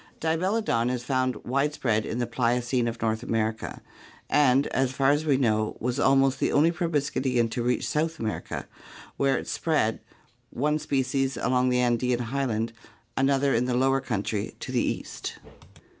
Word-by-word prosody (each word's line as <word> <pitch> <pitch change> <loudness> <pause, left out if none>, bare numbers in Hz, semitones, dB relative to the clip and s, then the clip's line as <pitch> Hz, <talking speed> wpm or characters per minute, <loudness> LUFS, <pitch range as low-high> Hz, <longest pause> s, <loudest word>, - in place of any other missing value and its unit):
Dibelodon 165 - +1
is 125 -1 -2
found 130 0 0
wide 140 +4 0
spread 110 -6 0
in 115 - -3
the 125 - 0
Pliocene 120 +1 0
of 115 0 -4
North 110 0 0
America 110 -2 -2 0.5
and, 140 -1 +4
as 130 -1 +1
far 135 +1 +3
as 145 +2 +1
we 140 -3 +4
know, 110 -4 +1
was 125 +2 -2
almost 135 0 +3
the - - +1
only 160 +4 +4
proboscidean 140 -7 0
to 120 - -2
reach 125 0 0
South 160 +2 -1
America, 110 -5 -4 0.5
where 135 -1 +2
it - - -6
spread, 150 -9 0 0.5
one 150 +4 0
species 135 -2 0
along 125 +1 +2
the 125 0 +2
Andean 125 0 +1
highland, 120 -2 -2 0.4
another 135 +1 +2
in 120 +2 +2
the 125 -1 0
lower 135 +1 +2
country 105 -3 -3
to - - -6
the - - +2
east. - - -4
130 Hz, 160 wpm, -26 LUFS, 120-140 Hz, 0.5 s, and